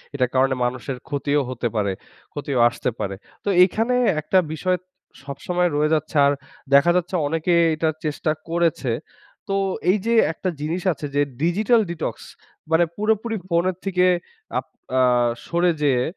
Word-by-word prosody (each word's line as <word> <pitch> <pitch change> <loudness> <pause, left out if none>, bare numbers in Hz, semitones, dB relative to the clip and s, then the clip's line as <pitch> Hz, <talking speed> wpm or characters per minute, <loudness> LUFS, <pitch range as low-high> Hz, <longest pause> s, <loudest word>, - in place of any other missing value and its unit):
এটার 130 -3 +1
কারণে 130 0 +3
মানুষের 125 +1 -3
ক্ষতিও 145 0 0
হতে 125 -1 -2
পারে 100 -2 +1 0.4
ক্ষতিও 140 -3 -2
আসতে 120 - -3
পারে। 100 -1 -3 0.3
তো 205 - -1
এইখানে 225 +7 +1 0.3
একটা 170 +5 +1 0.2
বিষয় 180 +3 0 0.5
সবসময় 175 +5 -1
রয়ে 150 +2 +2
যাচ্ছে 155 0 -1
আর 140 - +4 0.4
দেখা 140 +5 +6
যাচ্ছে 180 +1 0
অনেকেই 165 +3 +2
এটার 155 0 0
চেষ্টা 155 +1 -1 0.2
করেছে। 165 -7 0 0.6
তো 195 - -1 0.4
এই 210 - +2
যে 230 - +2 0.2
একটা 185 - -3
জিনিস 165 +4 -2
আছে 150 - -7
যে 145 - +3 0.2
ডিজিটাল 210 +8 +3
ডিটক্স 170 - -4 0.5
মানে 170 +1 +5
পুরোপুরি 220 +1 0
ফোনের 170 +1 +1
থেকে 180 -1 +2 0.5
আপ - - -9 0.3
আ - - +5 0.5
সরে 175 +1 +2
যেয়ে 130 -4 +3
160 Hz, 150 wpm, -22 LUFS, 140-180 Hz, 0.6 s, দেখা